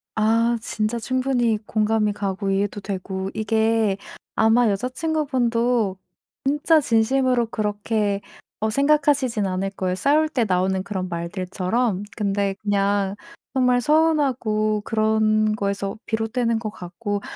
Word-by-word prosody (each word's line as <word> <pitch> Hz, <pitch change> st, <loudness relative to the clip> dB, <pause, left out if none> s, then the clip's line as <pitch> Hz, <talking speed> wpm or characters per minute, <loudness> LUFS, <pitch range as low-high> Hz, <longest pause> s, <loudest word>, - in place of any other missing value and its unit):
아 230 Hz, +2 st, +2 dB
진짜 220 Hz, +2 st, -2 dB
충분히 255 Hz, -2 st, +1 dB
공감이 215 Hz, -1 st, +1 dB
가고 195 Hz, -1 st, -2 dB
이해도 200 Hz, +1 st, -1 dB
되고 190 Hz, -1 st, -4 dB
이게 220 Hz, -2 st, +1 dB, 0.4 s
아마 225 Hz, +1 st, +4 dB
여자친구분도 245 Hz, -4 st, 0 dB, 0.5 s
진짜 295 Hz, +3 st, +3 dB
진심으로 250 Hz, -1 st, +2 dB
그렇게 210 Hz, -1 st, -1 dB, 0.4 s
어 220 Hz, +1 st, 0 dB
생각하시진 280 Hz, -4 st, +2 dB
않을 190 Hz, +1 st, -2 dB
거예요, 185 Hz, -2 st, -2 dB
싸울 305 Hz, +8 st, +2 dB
때 245 Hz, -7 st, 0 dB
나오는 190 Hz, 0 st, +1 dB
그런 190 Hz, -2 st, -4 dB
말들처럼. 185 Hz, +5 st, -2 dB
근데 200 Hz, -2 st, 0 dB
그냥 200 Hz, -1 st, +1 dB, 0.4 s
정말 250 Hz, -2 st, +3 dB
서운하고 255 Hz, -9 st, +2 dB
그런 215 Hz, -1 st, +2 dB
거에서 200 Hz, 0 st, -2 dB
비롯되는 225 Hz, +1 st, 0 dB
것 215 Hz, -1 st, -4 dB
같고 205 Hz, +2 st, -5 dB
220 Hz, 275 characters per minute, -23 LUFS, 200-245 Hz, 0.5 s, 아마